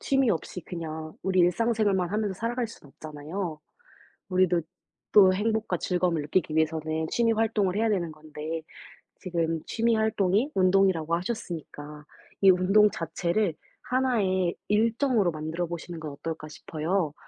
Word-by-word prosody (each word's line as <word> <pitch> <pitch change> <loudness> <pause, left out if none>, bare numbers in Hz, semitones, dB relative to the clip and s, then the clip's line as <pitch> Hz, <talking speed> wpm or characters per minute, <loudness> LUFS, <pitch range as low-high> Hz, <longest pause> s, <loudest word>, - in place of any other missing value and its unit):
취미 270 -4 +2
없이 180 +1 -3
그냥 160 -2 -6
우리 185 0 +2
일상 225 +7 +3
생활만 195 -5 +1
하면서 210 -2 -1
살아갈 235 +4 -2
수는 215 -9 -14
없잖아요. 155 +2 -6 0.7
우리도 185 -2 +3 0.5
또 190 -3 +7
행복과 215 -1 0
즐거움을 175 -2 0
느끼기 155 0 0
위해서는 160 0 0
취미 230 -1 +2
활동을 215 -4 +1
해야 225 +1 +2
되는 175 -6 0
건데. 155 +1 -6 0.6
지금 165 -3 -1
취미 230 0 +1
활동이 220 +2 +1
운동이라고 185 -3 +3
하셨으니까 165 -6 -5 0.4
'이 195 - +8
운동 195 +3 +5
자체를 170 +2 -1 0.3
1 255 -2 +1
의 185 -3 +1
일정으로 225 -1 +2
만들어보시는 165 +2 -4
건 155 -2 -5
어떨까?' 155 +1 -6
싶어요. 160 +1 -2
180 Hz, 330 characters per minute, -27 LUFS, 160-210 Hz, 0.7 s, 이